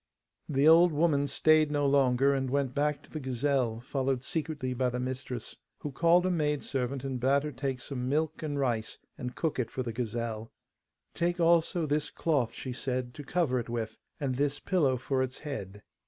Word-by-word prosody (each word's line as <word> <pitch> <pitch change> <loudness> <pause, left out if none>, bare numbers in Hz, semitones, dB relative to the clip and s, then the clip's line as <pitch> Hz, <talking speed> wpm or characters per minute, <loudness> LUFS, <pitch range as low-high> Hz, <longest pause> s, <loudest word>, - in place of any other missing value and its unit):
The 140 0 +3
old 170 +2 +7
woman 145 -2 +2
stayed 155 +2 +4
no 145 -1 +1
longer, 135 -1 +4
and 135 -1 -1
went 135 -1 0
back 145 +1 0
to - - -19
the 155 - -4
gazelle, 130 -3 0
followed 130 0 -1
secretly 145 -4 -2
by 125 0 +1
the 125 0 -3
mistress, 125 -1 -5 0.2
who 145 - -5
called 170 +6 +4
a 185 - +2
maidservant 140 -5 -1
and 135 -2 -3
bade 135 +3 +3
her 150 - -3
take 135 -1 -3
some 125 0 -4
milk 155 +2 0
and 150 -2 -3
rice 120 -5 -1 0.2
and 125 -1 -6
cook 160 -5 -1
it 115 -3 -1
for 130 - -3
the 115 -2 -4
gazelle. 115 -1 -3 0.6
'Take 175 +1 0
also 170 0 +3
this 150 0 0
cloth,' 140 -8 0
she 130 - -5
said, 125 -1 -3
'to 145 - -8
cover 145 -6 +1
it 120 - -6
with, 115 -2 -4 0.2
and 135 -4 -1
this 145 +1 0
pillow 150 -9 +2
for 130 +1 -1
its 130 0 -2
head. 105 -9 -6
135 Hz, 190 wpm, -30 LUFS, 125-150 Hz, 0.6 s, old